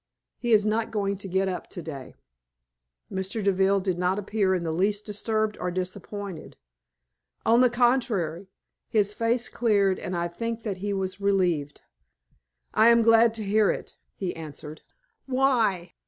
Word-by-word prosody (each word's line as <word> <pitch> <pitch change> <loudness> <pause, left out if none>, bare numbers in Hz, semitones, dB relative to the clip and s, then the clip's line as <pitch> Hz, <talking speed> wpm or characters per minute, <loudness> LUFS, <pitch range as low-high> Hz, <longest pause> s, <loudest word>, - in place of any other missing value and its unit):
He 240 - -2
is 210 -2 +5
not 220 +1 0
going 200 -2 -1
to 195 - -7
get 190 +1 0
up 185 -1 -4
to - - -7
day." 140 -5 -8 1.0
Mr. 190 +3 -3
Deville 195 0 +3
did 185 -2 -2
not 180 +2 +1
appear 200 -2 0
in 175 - -2
the 165 - -2
least 200 +5 0
disturbed 215 0 -1
or 180 - -2
disappointed. 185 0 -5 0.9
On 235 +2 +5
the 250 - +5
contrary, 230 -8 +1 0.4
his 205 -2 +2
face 230 +2 0
cleared, 200 -5 +1
and 180 0 -4
I 170 0 0
think 230 +6 -4
that 200 -4 -3
he 200 +2 -3
was 190 0 -3
relieved. 180 -8 0 0.9
"I 220 - +5
am 235 0 +6
glad 225 0 +5
to 220 - -3
hear 210 +1 +3
it," - - -4 0.2
he 185 -3 -4
answered. 155 -1 -9 0.5
"Why?" 245 -9 +1
200 Hz, 155 wpm, -26 LUFS, 185-225 Hz, 1.0 s, am